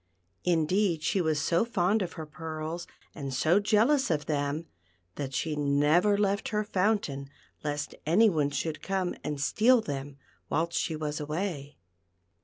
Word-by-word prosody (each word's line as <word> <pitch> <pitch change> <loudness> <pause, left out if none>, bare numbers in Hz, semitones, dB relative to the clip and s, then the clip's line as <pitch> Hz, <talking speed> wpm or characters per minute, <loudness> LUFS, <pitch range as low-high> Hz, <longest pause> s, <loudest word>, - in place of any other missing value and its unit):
Indeed, 175 0 +2
she 190 - +1
was 155 -3 +1
so 170 +6 +2
fond 215 -2 +1
of 180 - -3
her 160 -3 -6
pearls, 160 +2 -5 0.3
and 140 -3 -5
so 160 +8 +3
jealous 225 +7 +3
of 150 -3 0
them, 145 +1 -1 0.5
that 135 +3 -4
she 150 +4 -1
never 150 +8 +3
left 200 0 +1
her 210 -1 0
fountain 185 -9 0 0.3
lest 150 -1 -3
any 190 +9 +5
one 155 -7 +2
should 150 +2 -3
come 190 -2 -1
aneHpeal 215 - +3
them 140 -3 -5 0.3
whilst 170 +2 0
she 160 - -1
was 150 0 -3
away. 150 -1 -4
160 Hz, 145 wpm, -29 LUFS, 150-195 Hz, 0.5 s, any